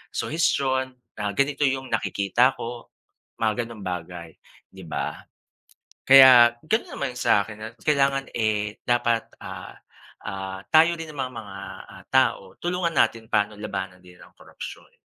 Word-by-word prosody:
suhestiyon 130 Hz, -5 st, 0 dB, 0.2 s
na 105 Hz, -1 st, -2 dB
ganito 140 Hz, +4 st, +1 dB
yung 130 Hz, 0 st, -3 dB
nakikita 105 Hz, +6 st, +1 dB
ko, 120 Hz, 0 st, -7 dB, 0.5 s
mga 115 Hz, +1 st, 0 dB
ganong 110 Hz, -4 st, -10 dB
bagay, 90 Hz, -2 st, -6 dB, 0.4 s
di -, -, -12 dB
ba? -, -, -4 dB, 0.9 s
Kaya 130 Hz, -3 st, +9 dB
ganun 220 Hz, +8 st, -1 dB
naman 140 Hz, -3 st, -2 dB
sa'kin, 110 Hz, -3 st, +1 dB
na 110 Hz, -, -6 dB, 0.2 s
kailangan 135 Hz, -2 st, +1 dB
eh, 105 Hz, -1 st, -1 dB
dapat, 120 Hz, -2 st, +1 dB, 0.2 s
ah -, -, -8 dB, 0.5 s
ah, 95 Hz, 0 st, -6 dB
tayo 165 Hz, +2 st, +6 dB
din 160 Hz, -1 st, -7 dB
na 145 Hz, -, -11 dB
mga, 105 Hz, -5 st, -9 dB, 0.6 s
tao 95 Hz, -1 st, +1 dB
tulungan 175 Hz, -2 st, -1 dB
natin 115 Hz, -3 st, +1 dB
pano 105 Hz, 0 st, +1 dB
labanan 95 Hz, -3 st, -5 dB
din 90 Hz, 0 st, -17 dB
ang -, -, -18 dB
korapsyon. -, -, -11 dB
115 Hz, 130 wpm, -24 LUFS, 100-135 Hz, 0.9 s, Kaya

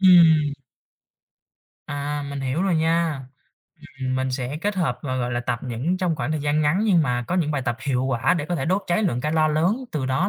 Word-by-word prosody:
Ừm. 165 Hz, -6 st, +6 dB, 1.3 s
À, 145 Hz, 0 st, -3 dB
mình 140 Hz, -1 st, -4 dB
hiểu 135 Hz, +6 st, -1 dB
rồi 195 Hz, -2 st, +2 dB
nha. 165 Hz, -2 st, +1 dB, 0.8 s
Ừm, 130 Hz, 0 st, -1 dB
mình 130 Hz, 0 st, -1 dB
sẽ 130 Hz, +2 st, -3 dB
kết 205 Hz, +3 st, -1 dB
hợp 130 Hz, -10 st, 0 dB
và, 130 Hz, -3 st, -2 dB
gọi 125 Hz, -1 st, -1 dB
là, 120 Hz, -, -1 dB
tập 120 Hz, -1 st, -2 dB
những 130 Hz, +8 st, -2 dB
trong 180 Hz, -4 st, 0 dB
khoảng 120 Hz, +2 st, -2 dB
thời 155 Hz, -, -1 dB
gian 150 Hz, +1 st, +1 dB
ngắn 150 Hz, +6 st, +2 dB
nhưng 185 Hz, -7 st, +4 dB
mà 125 Hz, -3 st, -1 dB
có 175 Hz, -, 0 dB
những 170 Hz, -5 st, +1 dB
bài 145 Hz, -3 st, -1 dB
tập 120 Hz, -2 st, -1 dB
hiệu 130 Hz, -2 st, +1 dB
quả 130 Hz, +1 st, +1 dB
để 160 Hz, -5 st, -2 dB
có 175 Hz, -, -2 dB
thể 135 Hz, -5 st, -2 dB
đốt 185 Hz, +6 st, +1 dB
cháy 175 Hz, +4 st, +1 dB
lượng 145 Hz, -, 0 dB
calo 155 Hz, +2 st, +2 dB
lớn, 160 Hz, +8 st, +2 dB, 0.2 s
từ 140 Hz, -4 st, -2 dB
đó 135 Hz, +9 st, +1 dB
150 Hz, 230 wpm, -23 LUFS, 130-170 Hz, 1.3 s, Ừm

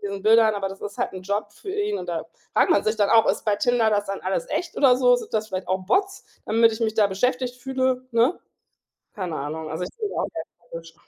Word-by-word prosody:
diesen 200 Hz, -1 st, -6 dB
Bildern, 220 Hz, -1 st, +5 dB
aber 195 Hz, -1 st, -2 dB
das 195 Hz, 0 st, -10 dB
ist 205 Hz, 0 st, -7 dB
halt -, -, -1 dB
'n 185 Hz, -1 st, -8 dB
Job 205 Hz, +2 st, -3 dB
für 380 Hz, -, -9 dB
ihn. 415 Hz, +1 st, -1 dB
Und -, -, -7 dB
da -, -, -3 dB, 0.3 s
fragt -, -, +3 dB
man -, -, +3 dB
sich 215 Hz, +1 st, 0 dB
dann 205 Hz, -2 st, +2 dB
auch: 225 Hz, -1 st, +6 dB
„Ist -, -, -4 dB
bei 210 Hz, -2 st, +2 dB
Tinder 230 Hz, 0 st, +2 dB
das 205 Hz, -1 st, 0 dB
dann 195 Hz, 0 st, -4 dB
alles 185 Hz, -2 st, -2 dB
echt 350 Hz, -, -3 dB
oder 255 Hz, -3 st, +5 dB
so? 250 Hz, -1 st, +5 dB
Sind 245 Hz, -, -4 dB
das 215 Hz, -1 st, 0 dB
vielleicht 185 Hz, -3 st, -5 dB
auch 185 Hz, 0 st, -1 dB
Bots, 390 Hz, -, 0 dB, 0.2 s
damit 225 Hz, +1 st, +4 dB
ich 220 Hz, -, -6 dB
mich 220 Hz, -1 st, 0 dB
da 210 Hz, -2 st, +4 dB
beschäftigt 250 Hz, +5 st, -1 dB
fühle“, 260 Hz, 0 st, -1 dB
ne? 235 Hz, +9 st, +2 dB, 0.7 s
Keine 180 Hz, -5 st, -4 dB
Ahnung. 155 Hz, +2 st, -5 dB
Also, 165 Hz, +3 st, -3 dB
ich -, -, -7 dB
bin 420 Hz, -2 st, -3 dB
da -, -, -7 dB
auch -, -, 0 dB
sehr 160 Hz, -, -5 dB, 0.4 s
skeptisch. 165 Hz, 0 st, -15 dB
220 Hz, 255 wpm, -24 LUFS, 195-250 Hz, 0.7 s, auch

